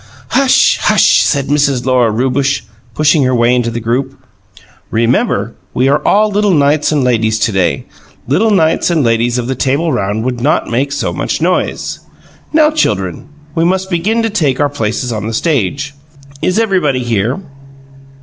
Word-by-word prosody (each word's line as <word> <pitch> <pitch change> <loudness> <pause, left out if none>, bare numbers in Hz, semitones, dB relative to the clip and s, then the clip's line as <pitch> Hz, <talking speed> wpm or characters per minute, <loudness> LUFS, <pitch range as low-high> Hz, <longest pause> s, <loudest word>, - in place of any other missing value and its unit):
"Hush, 265 0 +3
hush!" - - +4
said 140 -3 0
Mrs. 140 -4 +1
Lora 125 -3 +2
Rewbush, 130 +5 0 0.3
pushing 155 0 +3
her 130 -1 +1
way 120 +1 +3
into 120 -2 0
the 115 0 -4
group. 120 +4 -2 0.7
"Remember, 115 +2 0 0.2
we 130 - +2
are 145 - +2
all 210 +1 +2
little 205 -2 +2
knights 145 +1 +2
and 145 -3 +1
ladies 110 -3 +1
to 115 - 0
day. 95 -4 0 0.4
Little 190 - +2
knights 165 -6 +2
and 165 -4 +1
ladies 120 +1 +1
of 125 - -2
the 130 - -2
Table 140 +5 0
Round 100 +3 -2
would 125 -2 -3
not 145 +5 +1
make 135 +4 0
so - - -2
much - - -2
noise. - - -1 0.5
Now 310 -1 +4
children, 95 - -1 0.3
we 165 - 0
must 190 +2 0
begin 210 +7 0
to 225 - -1
take 150 -11 0
our 145 -1 +2
places 115 -1 -3
on 110 -1 -4
the 115 - -4
stage. 140 - -1 0.5
Is 185 - 0
everybody 180 - +1
here?" 115 - -1
135 Hz, 170 wpm, -13 LUFS, 120-165 Hz, 0.7 s, hush